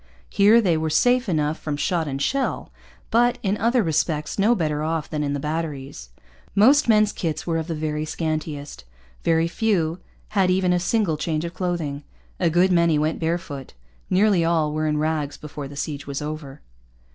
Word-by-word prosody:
Here 210 +4 +5
they 175 -6 +2
were 160 0 -1
safe 245 +8 +3
enough 155 -2 0
from 150 -2 -3
shot 170 0 0
and 135 -1 -3
shell; 270 - -1 0.4
but, 240 +1 +3
in 200 0 +1
other 235 +2 +2
respects, 155 0 -1
no 220 +5 +4
better 155 -6 -1
off 160 0 -2
than 150 -1 -3
in 145 -1 -1
the 145 - -2
batteries. 145 - -4 0.5
Most 265 +7 +5
men's 215 -1 +4
kits 160 -5 -3
were 165 -1 0
of 160 - -4
the 165 - -3
very 150 0 -2
scantiest. 155 - -4 0.4
Very 165 0 +2
few 180 -4 0 0.3
had 195 -3 +2
even 185 -1 +2
a 180 - +2
single 180 -3 0
change 155 +1 -2
of 170 - -6
clothing. 165 -6 -3 0.4
A 175 - +2
good 175 +3 +3
many 170 -3 +3
went 155 +2 0
bare 165 +1 0
foot. 140 - -9 0.3
Nearly 190 -2 +3
all 160 -3 +1
were 155 0 -1
in 150 0 0
rags 150 -2 -1
before 150 -2 -7
the 140 - -11
siege 145 0 -5
was 140 -1 -3
over. 150 -2 -6
160 Hz, 185 wpm, -23 LUFS, 150-185 Hz, 0.5 s, Here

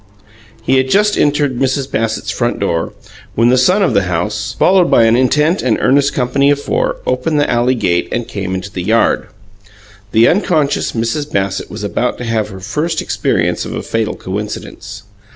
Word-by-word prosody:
He 130 +3 +2
had 130 0 +1
just 210 +5 +3
entered 145 -3 +1
Mrs. 135 0 -1
Bassett's 110 -1 -2
front 120 +4 -1
door, 85 -4 -1 0.4
when 115 +2 +3
the 125 - +4
son 185 +11 +3
of - - +1
the 100 - +2
house, 105 +8 -2
followed 185 -2 +4
by 115 - +5
an 115 0 +4
intent 150 +8 +2
and 120 -4 +1
earnest 140 +1 +3
company 140 +2 +1
of 145 0 +2
four, - - -1
opened 140 +5 0
the 145 - +2
alley 120 +2 +1
gate 85 -7 0
and 120 -1 -2
came 95 -4 -4
into 95 +2 -6
the 90 - -4
yard. 110 +5 +1 0.8
The 115 +1 +5
unconscious 160 -6 +1
Mrs. 135 +6 -2
Bassett 95 -1 -2
was 105 0 -7
about 120 +4 -1
to - - -6
have 115 -2 -1
her 95 -2 -9
first 150 - -2
experience - - -1
of - - -6
a - - -4
fatal 115 -1 -2
coincidence. 105 +1 -6
120 Hz, 185 wpm, -15 LUFS, 105-145 Hz, 0.8 s, by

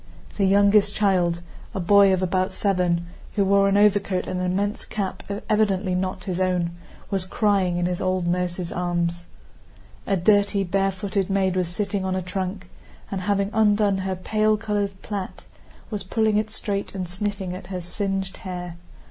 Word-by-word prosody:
The 200 - +2
youngest 200 +1 +4
child, 180 -4 +2 0.3
a - - -1
boy 200 +2 +6
of 190 0 +1
about 185 +1 0
seven, 180 -4 +1 0.3
who 200 -2 +3
wore 200 0 +4
an 200 - +3
overcoat 200 -2 +3
and 180 - -3
an 180 - 0
immense 205 +3 -1
cap 200 -3 -4 0.3
evidently 205 -3 +2
not 185 0 -2
his 185 -1 -2
own, 180 -2 +1 0.4
was 195 -2 0
crying 190 -2 +1
in 175 - 0
his 180 0 -1
old 185 -1 0
nurse's 175 0 -1
arms. 175 -1 -1 0.8
A 195 - +2
dirty, 200 +2 +3
barefooted 195 +1 -1
maid 190 -1 +1
was 180 -2 0
sitting 200 +2 -2
on 190 0 -1
a 185 - -1
trunk, 185 +1 -4 0.4
and, 195 -1 -2
having 200 +1 0
undone 210 -2 +3
her 190 0 -2
pale 215 +3 +1
colored 205 -3 -2
plait, 200 -3 -5 0.5
was 210 -2 -3
pulling 220 +2 +1
it 215 0 0
straight 200 -2 -4
and 185 -2 -3
sniffing 190 0 -3
at 185 - -9
her 185 -1 -4
singed 190 +2 -3
hair. 180 -2 -6
190 Hz, 165 wpm, -24 LUFS, 180-205 Hz, 0.8 s, boy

